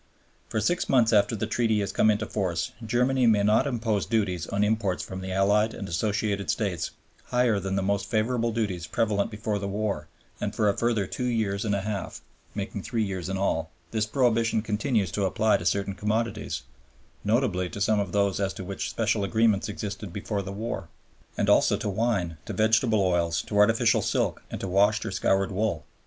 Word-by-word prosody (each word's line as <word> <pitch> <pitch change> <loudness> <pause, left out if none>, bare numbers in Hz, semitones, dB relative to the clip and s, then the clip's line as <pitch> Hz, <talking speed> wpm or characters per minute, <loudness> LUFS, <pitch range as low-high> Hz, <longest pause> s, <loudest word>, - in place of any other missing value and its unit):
For 110 - -1
six 175 +10 0
months 120 -4 +4
after 105 +2 +4
the 110 - -2
Treaty 110 -1 +1
has 100 - -2
come 110 - +3
into 110 +1 +1
force 90 -6 -2
Germany 125 +3 +2
may 105 -3 +4
not 110 +7 +3
impose 115 -5 -1
duties 95 -7 0
on 100 +1 0
imports 105 -5 0
from 95 0 -6
the 95 0 -5
Allied 105 +3 +2
and 100 - -6
Associated 100 +2 -1
States 95 -6 -1 0.4
higher 125 -4 +2
than 95 0 -2
the 100 - 0
most 100 0 0
favorable 115 +1 +1
duties 100 -7 -2
prevalent 105 +4 0
before 105 -1 -3
the 100 - -3
war 100 -6 -2 0.3
and 105 0 -3
for 105 -1 +2
a 100 - +2
further 115 -4 +1
two 125 - -4
years 110 -5 0
and 105 -2 +1
a 100 - -1
half 100 -1 -4 0.3
(making 100 0 -4
three 115 +2 -1
years 95 -3 -3
in 95 - -2
all) 80 -4 0 0.2
this 110 -1 0
prohibition 115 -3 +2
continues 110 - 0
to 100 +3 0
apply 110 +3 +2
to 85 - -3
certain 100 0 0
commodities, 105 - -2 0.6
notably 105 -5 +1
to 100 - -7
some 105 +1 +2
of 100 -3 -2
those 100 -1 +1
as 100 -1 0
to - - -6
which 100 +1 -4
special 110 -2 0
agreements 110 -1 +2
existed 100 -2 -5
before 100 +2 -3
the 95 0 -6
war, 100 -4 -4 0.5
and - - +1
also - - +4
to - - -4
wine, 100 -6 0
to - - -4
vegetable 110 -1 +3
oils, 85 -3 +1
to 105 - -6
artificial 105 +2 +4
silk, - - 0
and - - -5
to - - -3
washed 100 +3 +3
or - - -3
scoured 95 +1 +1
wool. 100 -5 -1
105 Hz, 195 wpm, -26 LUFS, 95-110 Hz, 0.6 s, months